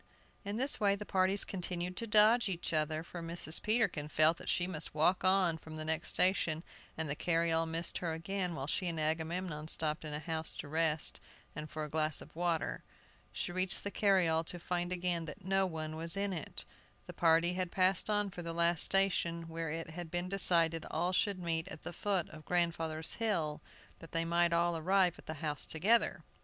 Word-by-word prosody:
In 200 +1 -4
this 265 +4 +2
way 200 -2 +3
the 210 +1 -7
parties 190 +1 +2
continued 180 -1 -4
to 230 - -4
dodge 215 +2 +5
each 175 -2 -3
other, 155 0 0
for 170 0 -8
Mrs. 165 -1 +2
Peterkin 215 -9 0
felt 155 +2 +3
that - - -7
she 175 - +2
must 160 -4 -2
walk 175 +5 +2
on 185 -3 +3
from 160 0 -10
the 155 0 -5
next 160 +1 -1
station, 170 -4 +2 0.3
and 160 -1 -2
the 140 - -1
carryall 165 0 +1
missed 165 +1 -3
her 170 -2 -2
again 180 +2 -3
while 135 - -4
she 180 +5 -1
and 165 -2 -2
Agamemnon 160 0 -2
stopped 155 -1 0
in 155 - -6
a 150 - -3
house 160 0 -1
to - - -7
rest, 155 0 +1 0.4
and 150 0 -6
for 155 - -5
a - - -4
glass 155 0 +2
of - - -12
water. 170 -3 -1 0.5
She - - -4
reached 185 +1 +1
the 200 - -3
carryall 180 -7 +2
to 175 - -2
find 175 +1 -2
again 175 -2 -1
that 170 +5 -10
no 195 0 +2
one 155 -2 -5
was 165 +3 -3
in 200 -1 -1
it. 160 -5 -4 0.4
The - - -9
party 165 +1 +3
had 180 -1 -2
passed 185 +2 +2
on 205 -1 +1
for 180 - -7
the 170 -1 -5
last 170 -1 +2
station, 170 -4 +2
where 165 0 -4
it 165 +1 -5
had 175 0 -7
been 175 +2 -1
decided 170 -4 +4
all 175 +3 -1
should 200 +1 +1
meet 165 -1 -2
at 185 - -9
the 175 - -6
foot 190 -1 -1
of 155 -1 -12
grandfather's 165 -2 0
hill, 170 -10 -1 0.4
that 165 - -13
they 165 0 +1
might 170 0 +2
all 170 0 +2
arrive 180 +2 +2
at - - -16
the 155 - -4
house 150 -1 -2
together. 195 0 +1
170 Hz, 205 wpm, -33 LUFS, 160-185 Hz, 0.5 s, dodge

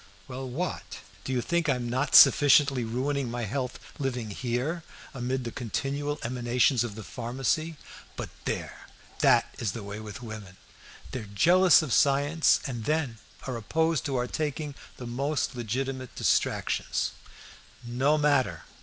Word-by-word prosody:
"Well, 130 0 -6
what? 170 +8 -4 0.3
Do - - -4
you 125 -2 +1
think 170 -2 0
I'm 125 -3 0
not 130 +4 0
sufficiently 140 -3 +7
ruining 130 +3 -1
my 120 0 -3
health 125 +4 -3 0.2
living 125 -6 -2
here 125 - -2 0.3
amid 130 0 -2
the 120 - -4
continual 140 +6 -3
emanations 120 +1 +2
of 115 -4 -5
the 110 - -7
pharmacy? 135 +8 -2 0.4
But - - -6
there! - - -4 0.3
that - - +4
is 105 -5 -1
the 115 - -6
way 100 +1 -6
with 110 +2 -8
women! 105 -4 -8 0.5
They 130 - -3
are 110 - -7
jealous 175 - +6
of 140 - -2
science, 145 +3 +3
and 120 -5 -4
then 145 -7 -1 0.3
are 130 - -3
opposed 160 +7 0
to 140 - -1
our 125 -1 +1
taking 150 +2 -3 0.2
the 125 - -7
most 135 +4 -1
legitimate 130 +2 -3
distractions. - - 0 0.7
No 130 +6 +2
matter! 140 - +2
130 Hz, 145 wpm, -28 LUFS, 120-145 Hz, 0.7 s, sufficiently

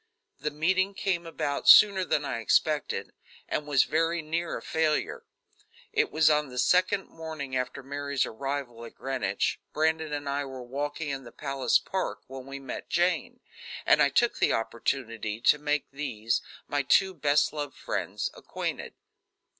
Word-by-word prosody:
The 150 - -1
meeting 190 +6 +1
came 175 -4 -1
about 150 -3 -1
sooner 200 -3 +8
than 150 -4 0
I 115 - -2
expected, 150 +6 +1 0.3
and 150 - -2
was 140 -3 +4
very 165 +1 0
near 165 +2 -2
a - - -8
failure. 160 - -1 0.7
It 430 -1 +2
was 160 - +3
on 150 -2 +3
the 125 - -9
second 185 +7 +3
morning 155 -5 -6
after 125 +2 -3
Mary's 140 0 -1
arrival 130 -1 -4
at 115 - -10
Greenwich. 135 -1 -1
Brandon 160 0 +1
and 145 -1 -3
I 140 +1 -1
were 130 -2 -7
walking 145 +4 -4
in 135 -1 -4
the 120 - -11
palace 135 -2 +1
park 190 -1 -3
when 130 0 -9
we 135 0 -6
met 135 -2 -7
Jane, 175 -1 0 0.4
and - - +5
I - - +5
took - - +2
the - - +3
opportunity 115 -1 -2
to 150 - +5
make 150 0 -1
these, 120 -6 -2 0.3
my 145 - 0
two 190 +7 +3
best 150 -3 +2
loved 145 -2 -5
friends, - - -3
acquainted. - - -5
145 Hz, 160 wpm, -28 LUFS, 135-160 Hz, 0.7 s, sooner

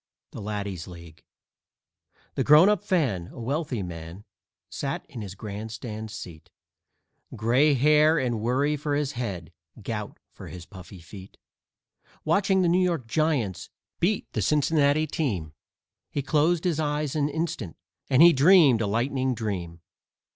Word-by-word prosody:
_ - - -60
THE - - -8
LADDIES' 100 -4 -5
LEAGUE 85 -3 -12 1.1
The - - -1
Grown 155 +6 +7
up 210 -1 +1
Fan, 130 - 0
a - - -12
wealthy 130 - -2
man, 85 +3 -9 0.4
sat 135 -1 -4
in 130 -7 -8
his 100 -2 -7
grandstand 110 +2 -7
seat, 85 -7 -10 0.9
Gray 125 +7 +3
hair 150 +4 +4
and 120 -6 -1
worry 135 +6 +1
for 145 0 -2
his 145 -1 -1
head, 95 - -5 0.3
gout 105 -1 -5
for - - -11
his 90 -2 -9
puffy 95 -1 -12
feet. 95 +3 -13 0.9
Watching 190 +3 +2
the - - +2
New 175 +2 +3
York 170 -8 -1
Giants 130 - -1 0.3
beat 195 +4 0
the - - -1
Cincinnati 150 0 +2
team, 100 - -3 0.6
He 140 - -3
closed 155 +4 +1
his 170 -4 0
eyes 150 -1 -1
an 145 -1 +1
instant 145 - -4 0.3
and 135 +4 +6
he 175 0 +8
dreamed 140 - +5
a 110 - 0
lightning 130 +4 0
dream. 90 -7 -5
130 Hz, 145 wpm, -26 LUFS, 100-150 Hz, 1.1 s, he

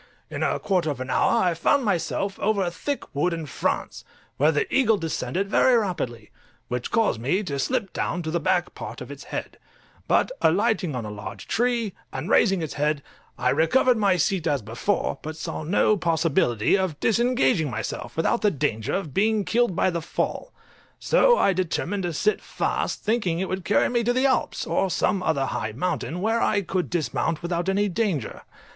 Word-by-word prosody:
In - - -4
a - - +1
quarter 180 -5 0
of 140 -4 -3
an 130 0 -4
hour 230 - +3
I 180 -2 +2
found 255 - +2
myself 195 0 -1
over 205 -2 +1
a 175 - -1
thick 280 - -4
wood 170 +5 +1
in 165 -2 -4
France, 140 - -2 0.3
where 150 +3 +4
the 150 - +1
eagle 225 -5 +4
descended 180 +3 -2
very 245 +4 +4
rapidly, 125 - -3 0.4
which 125 0 -3
caused 225 - +1
me 180 - +1
to 140 -7 -3
slip 200 - -1
down 175 0 -2
to 160 - -3
the 170 - 0
back 175 +2 0
part - - -7
of - - -8
its - - -9
head; - - -6 0.5
but - - +2
alighting 170 -8 +2
on 120 -3 -3
a 105 - -5
large 105 0 -8
tree, 235 -3 0 0.2
and 150 +11 -4
raising 195 -5 +4
its 155 - -4
head, 150 -1 0 0.3
I 125 0 +1
recovered 240 - +3
my 200 -4 +3
seat 175 0 0
as 145 -6 0
before, 115 - -1
but 155 +1 -6
saw 160 - -4
no 200 +6 +3
possibility 160 - +2
of 185 -6 -1
disengaging 225 - +2
myself 115 +5 -5
without 165 +8 +1
the 210 - +4
danger 135 - -1
of 175 -8 -4
being 215 0 +2
killed 235 -4 +1
by 185 - +2
the 170 -1 -2
fall; 335 - -3 0.5
so - - +4
I 195 - +3
determined 185 +2 -1
to 175 - -2
sit 210 +7 +1
fast, - - -2
thinking 210 -7 0
it 190 - -1
would 185 0 -3
carry 205 - +3
me 240 -1 0
to 245 - +2
the 255 +2 +2
Alps, 260 -1 +1
or 195 - 0
some 185 +2 +1
other 155 -6 +1
high 110 -4 -3
mountain, 160 +2 -2
where 225 +3 +1
I 205 -2 +2
could 180 0 -2
dismount 165 -1 -1
without 175 +1 -1
any 200 +2 +2
danger. 185 - -2
180 Hz, 190 wpm, -24 LUFS, 150-210 Hz, 0.5 s, where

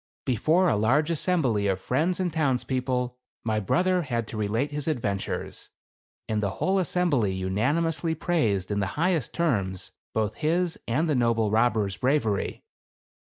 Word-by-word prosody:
Before 155 - +3
a 160 - +3
large 135 +10 +2
assembly 140 - +1
of 95 -1 0
friends 155 - 0
and 180 -3 -1
towns 140 -6 +1
people, 125 -1 -2 0.2
my 110 -1 0
brother 180 - +2
had 120 -7 -2
to - - -7
relate 110 +7 -1
his 150 0 -3
adventures, 105 -10 -3 0.6
and 110 -1 0
the 100 - 0
whole 190 +1 +2
assembly 145 - +1
unani 105 - +1
mously 165 0 -1
praised, 105 - 0
in 100 - 0
the 95 - 0
highest 165 -5 +1
terms, 100 - -1 0.2
both 110 -1 0
his 170 +2 0
and 150 +8 +1
the 155 - +2
noble 115 -4 +2
robber's 110 -4 +2
bravery. 125 -6 0
125 Hz, 155 wpm, -26 LUFS, 105-160 Hz, 0.6 s, Before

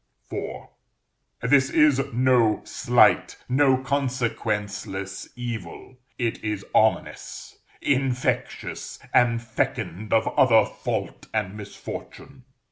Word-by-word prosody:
IV. - - -5 0.8
This 130 +2 +4
is 150 -4 +4
no 120 -3 +3
slight, - - +3
no 130 0 +4
consequenceless 110 -7 -2
evil: 120 +1 -7 0.2
it 115 -4 -2
is 105 -2 -3
ominous, - - 0 0.2
infectious, 130 -2 -1 0.2
and 120 -1 +4
fecund 110 -3 -3
of 110 - +3
other 115 -4 +5
fault - - -4
and 105 -2 -1
misfortune. 125 +5 -9
120 Hz, 90 wpm, -25 LUFS, 110-130 Hz, 0.8 s, other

